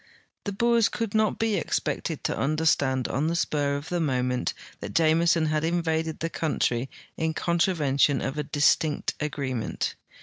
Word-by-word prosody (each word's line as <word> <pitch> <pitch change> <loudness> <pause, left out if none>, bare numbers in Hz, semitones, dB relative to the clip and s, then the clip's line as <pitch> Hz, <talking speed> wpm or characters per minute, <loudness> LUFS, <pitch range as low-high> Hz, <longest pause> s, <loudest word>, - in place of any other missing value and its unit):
The 205 - -2
Boers 235 +2 +3
could 230 -4 -3
not 215 -1 +2
be 220 -2 +1
expected - - -2
to - - -1
understand 140 -4 +1
on 145 +4 -1
the 170 - 0
spur 145 -4 0
of 145 +2 -6
the 175 - -1
moment 125 -5 0 0.2
that - - -7
Jameson 165 0 +3
had 155 0 0
invaded 160 -1 -1
the 165 - -1
country 135 -5 -1 0.3
in 160 0 -1
con 170 0 0
travention 145 -5 +2
of 135 - -3
a 150 - -1
distinct 150 +1 +1
agreement. 135 -5 -2
155 Hz, 160 wpm, -26 LUFS, 140-170 Hz, 0.3 s, Boers